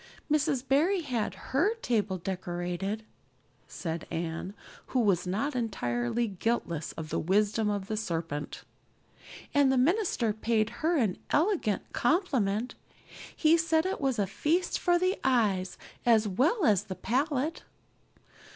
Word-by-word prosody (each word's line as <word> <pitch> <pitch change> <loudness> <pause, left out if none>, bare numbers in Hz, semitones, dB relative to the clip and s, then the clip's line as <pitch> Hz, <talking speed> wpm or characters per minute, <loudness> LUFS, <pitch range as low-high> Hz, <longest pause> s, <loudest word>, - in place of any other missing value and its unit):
"Mrs. 285 -3 +1
Barry 340 +8 +3
had 235 - -2 0.2
her 370 - +2
table 215 - -1
decorated," 180 +3 -3 0.6
said 165 -2 -5
Anne, 170 +4 -4 0.3
who 255 - 0
was 195 -6 +2
not 225 +10 -1
entirely 200 - -1
guiltless 190 -6 -2
of 160 -1 -7
the - - -1
wisdom 210 +5 +2
of 205 -2 -2
the 215 - -3
serpent, 165 -8 -4 0.9
"and 285 -2 +4
the 265 - +2
minister 275 - +2
paid 220 0 0
her 330 +2 +2
an 220 -9 0
elegant 310 - +1
compliment. 245 - +1 0.6
He 320 +1 +4
said 325 0 +2
it 380 -3 -2
was 265 -3 +1
a 205 - +2
feast 315 - 0
for 350 -1 +3
the 370 +2 0
eye 215 -8 +3 0.4
as 225 -3 +4
well 300 - +2
as 210 -1 +3
the 190 -3 -5
palate." 275 - -1
225 Hz, 135 wpm, -29 LUFS, 190-295 Hz, 0.9 s, and